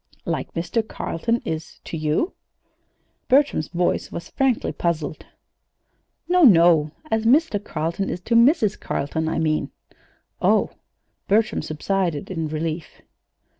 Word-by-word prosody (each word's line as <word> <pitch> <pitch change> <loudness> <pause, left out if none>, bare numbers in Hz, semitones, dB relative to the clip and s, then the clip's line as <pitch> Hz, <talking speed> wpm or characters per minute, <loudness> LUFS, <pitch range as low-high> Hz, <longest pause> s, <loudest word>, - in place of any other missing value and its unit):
"Like - - -3
Mr. 175 +8 0
Carleton 230 +7 -2
is 160 0 -5
to - - -6
you?" 155 - 0 0.9
Bertram's 275 - +3
voice 175 0 -1
was 170 - -7
frankly 265 -4 +1
puzzled. 160 -3 -3 1.0
"No, 360 0 +3
no! 170 - +6 0.2
As 220 0 +1
Mr. 245 -4 +3
Carleton 165 +3 -3
is - - -3
to 230 - -2
Mrs. 230 - +4
Carleton, 160 +3 -2
I - - -2
mean." 155 -1 0 0.7
"Oh!" - - +3 0.6
Bertram 215 +2 +2
subsided 165 +1 -2
in 165 -3 -2
relief. 155 +1 -5
175 Hz, 120 wpm, -23 LUFS, 160-230 Hz, 1.0 s, no